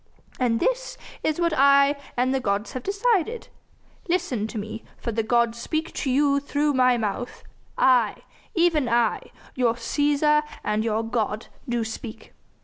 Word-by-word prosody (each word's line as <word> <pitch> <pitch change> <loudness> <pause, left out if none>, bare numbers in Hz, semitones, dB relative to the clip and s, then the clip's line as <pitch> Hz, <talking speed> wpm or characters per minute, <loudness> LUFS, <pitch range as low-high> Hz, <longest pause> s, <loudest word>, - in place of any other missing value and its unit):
And 235 -3 +2
this - - -1 0.2
is 315 +1 -1
what 340 -1 +1
I 280 0 +5 0.2
and 255 +2 +2
the 270 - +1
gods 205 -2 -1
have 255 - -5
decided. 415 - 0 0.6
Listen 330 - 0
to 220 - -7
me, 215 +2 -6
for 235 - -4
the 225 +1 0
gods 235 +1 +1
speak 315 +6 -3
to 270 - -2
you 280 +2 +3
through 290 +1 0
my 255 -2 +4
mouth 220 +2 -4 0.3
I, 245 -5 +3 0.3
even 330 -7 +2
I, 235 -1 +1 0.2
your 240 -2 +1
Cæsar 295 +5 +2 0.2
and 210 +1 0
your 225 0 0
god, 225 -1 -2 0.2
do 240 -1 0
speak. 225 0 -8
255 Hz, 150 wpm, -24 LUFS, 230-300 Hz, 0.6 s, I